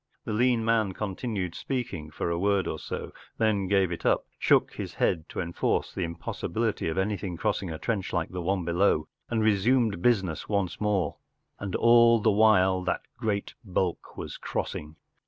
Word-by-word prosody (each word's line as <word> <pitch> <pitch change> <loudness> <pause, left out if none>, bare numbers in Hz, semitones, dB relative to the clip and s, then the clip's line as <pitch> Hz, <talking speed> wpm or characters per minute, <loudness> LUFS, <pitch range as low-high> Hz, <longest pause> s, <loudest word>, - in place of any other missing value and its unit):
The 110 - -2
lean 120 0 +2
man 110 -4 +2
continued 100 -2 -3
speaking 115 - -4
for 75 +3 -3
a 85 - -1
word 100 0 +2
or 80 - -3
so, - - -5 0.3
then 105 -4 +1
gave 95 -2 +2
it 85 - -3
tip, - - +1
shook - - +3
his - - -6
head 80 -2 0
to - - -5
enforce 85 -1 -1
the 95 - -2
impossibility 85 +6 -2
of 80 - -3
anything 95 -2 -1
crossing 100 -1 -1
a 80 - -4
trench 100 +1 -2
like 85 -2 -1
the 90 0 -4
one 90 0 0
below, 85 -2 +2 0.2
and 110 -2 +1
resumed 110 -1 +2
business 95 -8 +1
once 100 -3 -1
more* 105 -4 0 0.4
And 100 -2 -4
all 115 0 +6
the 110 +1 +3
while 100 -3 +4
that - - -1
great 100 -2 -2
bulk 95 -3 -2
was - - -6
cross - - -3
i - - -2
n 75 0 -11
g. - - -28
100 Hz, 185 wpm, -27 LUFS, 90-110 Hz, 0.4 s, all